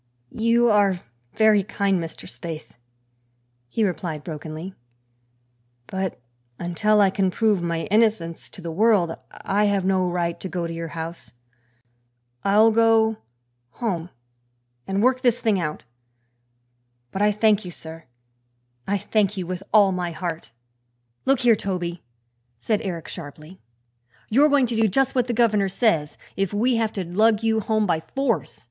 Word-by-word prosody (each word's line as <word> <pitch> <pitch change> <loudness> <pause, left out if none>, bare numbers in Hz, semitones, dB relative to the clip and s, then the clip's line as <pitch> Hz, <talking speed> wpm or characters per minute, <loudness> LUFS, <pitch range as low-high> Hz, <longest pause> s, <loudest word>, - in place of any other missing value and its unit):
"You 230 +1 +3
are 200 -4 +3 0.3
very 220 -2 +5
kind, 195 -1 0
Mr. 165 -1 -8
Spaythe," 155 +6 -7 1.0
he 220 - 0
replied 175 -5 -3
brokenly, 160 +3 -7 1.1
"but 190 +2 -4 0.4
until 210 +5 +2
I 195 -2 +4
can 195 -1 +1
prove 210 -1 +1
my 170 -1 -1
innocence 210 -7 +1
to 185 - -13
the 165 - -4
world 195 -3 +3 0.2
I 205 +2 0
have 200 -2 +1
no 185 -1 +2
right 170 -1 -2
to 190 - -6
go 175 -1 -3
to 165 - -4
your 165 0 -5
house. 165 -2 -7 1.1
I'll 215 +3 +5
go 225 -1 +3 0.6
home 180 -8 -3 0.8
and 195 +2 0
work 255 0 +3
this 245 -2 +2
thing 215 -5 +1
out. 155 -6 -4 1.3
But 190 - -3
I 210 0 +4
thank 210 0 +2
you, 180 - -7
sir; 165 -1 -11 0.8
I 200 +1 +1
thank 205 0 0
you 185 - -3
with 180 +1 -5
all 205 -2 +6
my 180 -1 -2
heart!" 170 -4 -5 0.8
"Look 270 -1 +3
here, 240 -2 +5
Toby," 180 -4 -4 0.5
said 210 - -1
Eric 170 -5 -5
sharply, 155 +2 -10 0.7
"you're 280 +7 +5
going 285 -3 +4
to 235 -1 -3
do 225 0 +3
just 270 +6 +1
what 250 -2 +1
the 240 - -1
governor 210 -4 +3
says, 185 -8 +1 0.2
if 195 +1 -1
we 240 +3 +2
have 225 -1 0
to 195 - -3
lug 215 +5 +2
you 220 0 +2
home 215 0 0
by 170 -4 +1
force. 265 +7 -2
195 Hz, 150 wpm, -23 LUFS, 175-220 Hz, 1.3 s, all